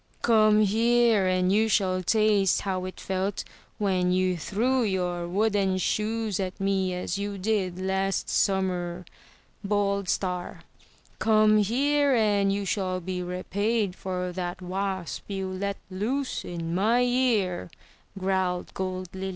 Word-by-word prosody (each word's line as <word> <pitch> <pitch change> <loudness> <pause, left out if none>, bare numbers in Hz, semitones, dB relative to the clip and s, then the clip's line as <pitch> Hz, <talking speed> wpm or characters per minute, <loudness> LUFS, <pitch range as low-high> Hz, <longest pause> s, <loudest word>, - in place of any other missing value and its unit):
"Come 215 -2 +5
here, 225 -1 +3
and 185 0 +2
you 220 +2 +3
shall 185 -3 +1
taste 205 -1 +3
how 185 -2 -2
it 185 - -7
felt 190 +1 -2 0.3
when 185 -3 +1
you 185 0 +2
threw 230 - 0
your 180 -5 -1
wooden 200 0 +1
shoes 215 +1 -1
at 185 -1 -4
me, 195 -1 0
as 180 +2 -3
you 200 0 -3
did 190 -3 -1
last 190 +1 -1
summer!" 180 -2 0 0.6
bawled 200 -1 0
Star. 180 -2 -2 0.6
"Come 215 -1 +4
here, 280 +6 +2
and 205 -3 +2
you 200 0 -1
shall 185 -2 -1
be 180 +1 -4
repaid 195 +3 -1
for 180 -1 -3
that 180 0 -4
wasp 190 -1 -4
you 195 -1 -3
let 200 +1 -3
loose 250 +9 -2
in 165 -1 -5
my 220 +7 +3
ear!" 240 -9 +1 0.5
growled 185 -2 -1
Gold 185 -1 -4
Lily. 190 0 -4
195 Hz, 135 wpm, -26 LUFS, 185-215 Hz, 0.6 s, Come